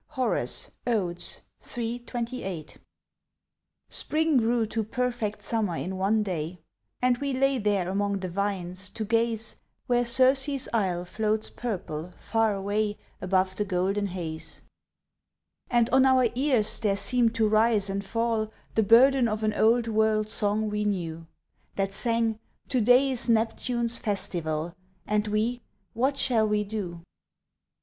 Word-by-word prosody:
_" - - -43
HORACE, 255 -2 -1 0.2
Odes, 185 -7 -2 0.4
iii. 235 0 -2
28. 235 -9 -6 1.1
Spring 315 0 0
grew 235 -1 +2
to 220 +1 -2
perfect 235 -2 -3
summer 215 -7 0
in 190 +1 -4
one 205 +3 +1
day, 175 -2 -4 0.4
And 250 -1 +2
we 280 -1 -2
lay 270 0 +1
there 200 -4 0
among 200 +1 -1
the 185 -1 -4
vines, 185 -1 -2
to 220 - -5
gaze 225 0 +2 0.3
Where 245 -1 +2
Circe's 265 +3 +4
isle 185 -5 0
floats 215 +3 -2
purple, 180 -7 -5
far 225 -2 0
away 205 +2 -1 0.2
Above 185 0 0
the 210 - 0
golden 195 +1 -1
haze: 170 -4 -4 1.1
And 240 -2 +3
on 265 0 +5
our 255 -2 +4
ears 250 -4 +1
there 205 -3 0
seemed 235 +2 +3
to 225 -1 +2
rise 215 -1 +3
and 200 0 -3
fall 225 0 -1 0.2
The 220 - +2
burden 245 +4 +5
of 215 0 -3
an 215 0 +1
old 230 +2 +3
world 215 -1 +1
song 215 0 +1
we 210 0 -1
knew, 165 -5 -3 0.5
That 195 0 -1
sang, 230 0 +1 0.3
"To 255 -3 +1
day 250 +4 +4
is 245 -1 0
Neptune's 235 +1 +1
festival, 175 -6 -1 0.3
And 210 0 0
we, 220 +4 -1 0.3
what 270 +4 0
shall 225 -5 +3
we 210 0 +1
do?" 195 -5 -6
215 Hz, 140 wpm, -26 LUFS, 195-240 Hz, 1.1 s, on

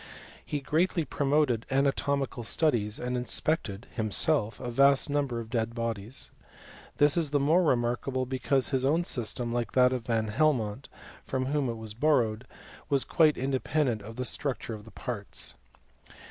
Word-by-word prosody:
He 145 - -4
greatly 165 +3 +1
promoted 140 -6 +1
anatomical 140 -1 0
studies, 110 -5 +1
and 125 0 -3
inspected, 125 -3 -1
himself, 110 0 +2
a 120 - -5
vast 140 +3 +4
number 140 -5 -1
of 115 -1 -8
dead 115 -1 -1
bodies. 115 0 -3 0.7
This 145 +2 +5
is 165 -4 +2
the 145 0 +1
more 155 +6 +3
re 155 -7 +3
markable, 125 +2 -2
because 130 +1 +1
his 130 -2 0
own 155 +6 +2
system, 120 -4 -2
like 120 -1 -2
that 125 0 +4
of 125 -3 -4
Van 110 -2 0
Helmont, 120 -2 0 0.3
from 130 -1 -2
whom 140 -1 0
it 115 - -4
was 110 -1 -8
borrowed, 120 -3 +1 0.4
was 140 -2 +3
quite 155 -3 +3
in 135 +2 -2
dependent 130 -4 0
of 110 +3 -10
the 125 +1 -3
structure 130 -3 -2
of 105 -1 -9
the - - -12
parts. 115 -6 -4
130 Hz, 160 wpm, -28 LUFS, 115-145 Hz, 0.7 s, This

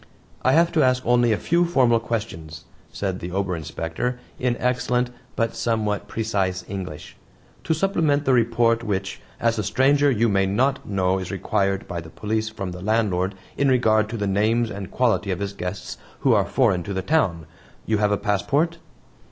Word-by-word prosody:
"I 130 - +3
have 170 +1 +4
to 160 - +2
ask 130 -1 +2
only 120 -1 +3
a 105 - +2
few 170 +8 +2
formal 130 -9 +3
questions," 80 -9 -5 0.3
said 95 -2 -3
the 85 - -5
Ober 95 -1 -1
Inspector 80 - -4 0.2
in 125 -1 0
excellent 125 0 0 0.2
but 115 -1 -1
somewhat 110 -3 -1
precise 95 -5 -1
English, 90 -6 -7 0.5
"to 160 - +1
supplement 155 -5 +1
the 130 - +3
report 115 -1 +2
which, 95 -3 -3 0.2
as 115 -1 +1
a - - 0
stranger, 140 +6 +3
you 115 -3 +2
may 95 -2 +2
not 130 +6 0
know 95 -1 +1
is 90 - -5
required 100 0 -1
by 85 -1 -4
the 80 - -11
police 110 +4 -2
from 100 -4 -5
the 90 0 -8
landlord 100 -3 0 0.2
in 140 - +2
regard 110 -4 +3
to 115 - -4
the 105 - -1
names 110 +4 +1
and 100 -2 -6
quality 120 -5 +1
of 95 - 0
his 100 +1 -4
guests 95 0 -6 0.2
who - - +4
are - - +3
foreign 90 -3 +2
to 100 +3 -5
the 95 - -2
town. 95 - +1 0.4
You 110 -1 +1
have 105 -1 +2
a 105 - +2
passport?" 145 - 0
110 Hz, 185 wpm, -23 LUFS, 95-125 Hz, 0.5 s, have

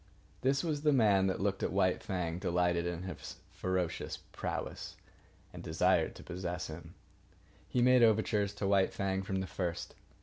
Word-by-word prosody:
This 135 +2 +2
was 155 -4 -1
the 150 0 +4
man 100 -6 +4
that 95 - -1
looked 95 -1 0
at - - 0
White 95 -1 +2
Fang, 90 -4 -2
delighted 90 -1 +1
in 85 0 -3
his 95 - -7 0.2
ferocious 90 -3 -2
prowess, - - -4 0.6
and - - -8
desired - - +2
to - - -11
possess 90 0 -4
him. 80 +1 -9 0.7
He 125 - +2
made 125 0 +6
overtures 105 -2 +3
to 100 -1 -2
White 100 -1 +3
Fang 95 -1 -1
from 95 0 -2
the - - -2
first. 90 -2 -3
95 Hz, 165 wpm, -33 LUFS, 90-105 Hz, 0.7 s, made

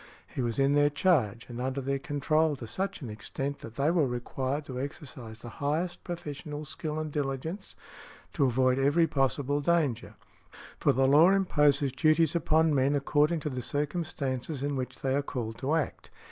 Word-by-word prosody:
He - - -4
was 115 -2 -1
in 135 +1 +3
their 145 0 +4
|164| 145 - -19
charge 125 - +2
and 120 0 -6
under 130 +2 -2
their 135 +1 -1
control 150 +2 +1
to 130 - -8
such 190 - -3
an 120 - -5
extent 135 +6 -4
that 115 0 -10
they 140 +5 +2
were 165 -5 +3
required 130 +4 -3
to 130 -2 -5
exercise 130 -6 -7
the 120 - -9
highest 160 +5 -1
professional 150 -3 -6
skill 150 +1 -4
and 155 -1 -3
diligence 145 +6 -4 0.6
to 140 - +2
avoid 130 +1 +2
every 145 +5 +4
possible 140 0 0
danger; 150 -6 0 0.6
for - - +4
the 135 +2 +2
law 150 +6 +7
imposes 150 -8 +3
duties 155 +4 +3
upon 160 -1 +3
men 140 +1 +2
according 150 +3 +2
to 150 - -2
the 130 -1 -3
circumstances 145 -2 -3
in 145 0 -1
which 125 -1 -5
they 135 -1 +1
are 140 - +2
called 115 -5 -5
to 140 +4 0
act. 160 - -3
145 Hz, 180 wpm, -29 LUFS, 130-155 Hz, 0.6 s, law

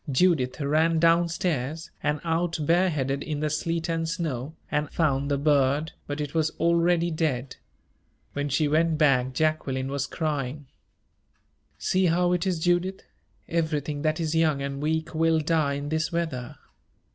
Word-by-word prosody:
Judith 135 -3 +2
ran 155 +3 +2
down 170 +1 +4
stairs, 160 -2 -2
and 150 0 0
out 165 +1 0
bareheaded 150 -4 +1
in 150 -1 -3
the 150 0 -1
sleet 165 +2 -1
and 165 -1 -1
snow, 160 -4 -3 0.2
and 150 0 0
found 140 -4 0
the 140 - +1
bird 145 +1 +2 0.2
but 145 +1 -4
it 145 -1 -4
was 160 -1 +2
already 170 0 +2
dead. 140 -5 -2 0.8
When 145 0 -2
she 150 +2 +2
went 160 +2 +2
back, 135 -4 +3
Jacqueline 135 -3 0
was 140 0 -2
crying. 145 -3 -3 1.1
"See 185 0 +1
how 175 +1 +2
it 180 +1 0
is, 180 -2 +1
Judith 175 +3 0 0.4
everything 155 -3 -1
that 155 +1 0
is 160 -2 -1
young 160 -3 +2
and 140 0 -4
weak 160 +1 -1
will 160 0 +3
die 155 -2 +1
in 145 +1 -4
this 160 0 -1
weather." 160 -8 -3
155 Hz, 155 wpm, -26 LUFS, 145-165 Hz, 1.1 s, down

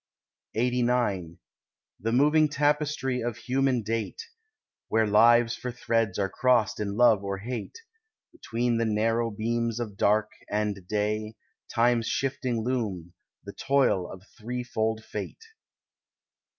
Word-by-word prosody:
LXXXIX 120 -7 0 0.6
The 115 +3 -2
moving 150 +5 +4
tapestry 145 -3 0
of 120 -2 -3
human 130 -2 0
date, 115 - -3 0.7
Where 110 0 +2
lives 115 +2 +5
for 125 - -5
threads 115 -4 0
are 100 -1 +1
crossed 120 0 +2
in 100 -1 -3
love 115 -5 +5
or 100 0 -3
hate, 120 - -6 0.5
Between 120 - -1
the 115 - +1
narrow 115 +2 +1
beams 115 +2 -2
of 105 -4 -5
dark 105 +1 +2 0.2
and 105 -3 -2
day— 105 +1 -1 0.4
Time's 115 -1 +2
shifting 130 -4 -1
loom, 105 -9 -3 0.3
the - - -9
toil 135 -10 +1
of 95 -1 -11 0.2
threefold 110 -1 -2
fate. 450 - -6
115 Hz, 120 wpm, -27 LUFS, 105-125 Hz, 0.7 s, lives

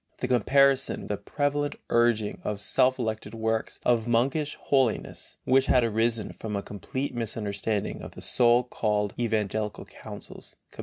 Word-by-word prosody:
In 125 - -1
comparison 135 +3 +3
with - - -9
the 105 - -1
prevalent 145 +3 -1 0.2
urging 120 -3 +2
of 105 -1 -3
self 130 +5 +2
elected 110 -2 -3
works 110 0 -2
of 120 -2 +2
monkish 135 +6 +1
holiness, 130 -5 0
which 130 +1 +4
had 125 - +4
arisen 115 -1 0
from 110 -2 -5
a 100 - -2
complete 130 +7 -4
misunderstanding 105 -3 -2
of - - -9
the - - -9
so 120 0 +4
called 105 -4 -1
evangelical 110 -2 -1
counsels - - -11 0.2
(comp. - - -20
115 Hz, 150 wpm, -27 LUFS, 105-130 Hz, 0.2 s, which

